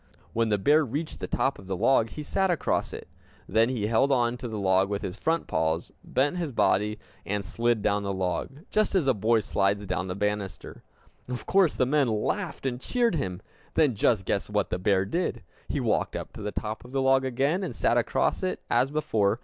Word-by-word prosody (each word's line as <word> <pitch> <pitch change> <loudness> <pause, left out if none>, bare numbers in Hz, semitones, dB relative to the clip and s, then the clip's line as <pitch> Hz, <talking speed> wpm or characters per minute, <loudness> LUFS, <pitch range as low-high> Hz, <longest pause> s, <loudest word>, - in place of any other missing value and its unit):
When 115 0 +1
the 105 - +2
bear 150 +10 +4
reached 145 +5 -4
the - - -4
top 135 - 0
of 95 - -13
the 95 -1 -2
log, 115 +2 +3
he 150 - -7
sat 190 +5 +1
across 175 - 0
it. - - -8 0.4
Then 115 +2 +3
he 120 -5 -1
held 115 +6 +2
on 120 -2 +2
to 125 - -6
the 110 -2 -5
log 95 -1 +2
with 100 -1 -2
his 90 - -5
front 165 +1 0
paws, 80 +1 -1
bent 145 +6 0
his 165 -5 -2
body, 105 -1 +2 0.3
and 100 0 -2
slid 115 +6 0
down 100 0 +2
the 100 -1 -2
log 95 +9 -3
just 215 -1 +1
as 180 -6 +3
a 135 - +4
boy 110 +1 +2
slides 100 0 0
down 95 0 -2
the 90 - -3
banister! 105 -1 -3 0.5
Of 125 -1 -5
course 190 -5 +3
the 130 - +2
men 140 +1 +2
laughed, 140 - -2
and 125 -1 -2
cheered 240 - +1
him. 95 - -3 0.3
Then 150 -5 +4
just 100 -1 +2
guess 100 - -1
what 105 -2 0
that 90 - -1
bear 95 0 +2
did! 120 - -2 0.3
He - - -1
walked - - 0
up - - -6
to - - -9
the 105 0 -3
top 110 +1 -4
of 125 - -13
the 135 - +1
log 135 0 +4
again, 135 +8 0
and 150 -11 -4
sat - - +2
across - - +1
it, - - -2
as 135 - +3
before. 110 -8 +1
115 Hz, 220 wpm, -27 LUFS, 100-140 Hz, 0.5 s, bear